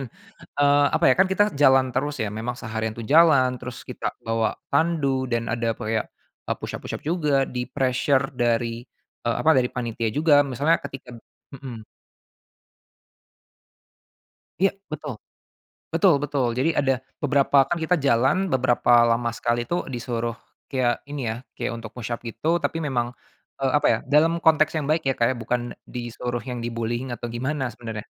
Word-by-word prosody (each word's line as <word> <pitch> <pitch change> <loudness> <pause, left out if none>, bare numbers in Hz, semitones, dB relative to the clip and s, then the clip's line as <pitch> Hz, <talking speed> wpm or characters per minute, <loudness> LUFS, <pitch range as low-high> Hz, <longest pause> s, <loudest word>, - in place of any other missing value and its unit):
dan, 120 - -11 0.5
eee, 145 0 +5
apa - - +1
ya 130 - +6
kan 190 - +5
kita 205 +2 +4
jalan 135 -2 +5
terus 145 0 -1
ya 110 - 0
memang 110 +4 -4
seharian 110 0 -3
tuh 115 -1 -8
jalan, 140 -5 +5
terus 125 0 -8
kita - - -3
bawa 115 0 0 0.2
tandu 140 -4 +1
dan 115 0 0
ada 115 -1 0
kayak, 110 0 -1 0.4
eee, - - 0
push-up - - -6
push-up - - -5
juga, 150 -4 +1
di 125 0 -3
pressure 130 +2 +1
dari 120 0 0 0.4
eee, 120 -1 +1
apa 160 - +4
dari 125 -1 +3
panitia 115 -2 -2
juga, 145 0 +4
misalnya 140 +5 +2
ketika 130 -3 -9 0.4
mhm. 125 -5 -9 2.8
Iya, 195 0 +4 0.2
betul. 150 -5 -5 0.8
Betul 165 -2 +4
betul, 140 -4 0
jadi 135 +8 0
ada 135 -2 +2 0.3
beberapa 140 -1 +4
kan 170 +5 -2
kita 160 +3 +2
jalan 140 +6 +2
beberapa 120 -2 +4
lama 115 0 +1
sekali 120 +1 -1
itu 175 +8 -3
disuruh 120 -2 -3 0.3
kayak 125 -3 0
ini 140 -6 -3
ya, 110 - -4 0.2
kayak - - -3
untuk 110 -2 -9
push-up 120 -1 -4
gitu, 160 +9 0
tapi 165 -1 -2
memang 120 -4 -1 0.4
eee, 135 -1 0
apa 150 - +3
ya, 115 - +4
dalam 165 +3 +2
konteks 155 0 +4
yang 155 - 0
baik 155 0 0
ya, 135 - +1
Kak, 115 +2 +2
ya, 130 - -3
bukan 120 +1 -2 0.2
disuruh 120 0 -5
yang 125 -2 -5
di-bullying 120 +2 -3
atau 120 +1 -6
gimana 130 +2 -2
sebenarnya, 110 -2 -7
130 Hz, 160 wpm, -24 LUFS, 120-145 Hz, 2.8 s, ya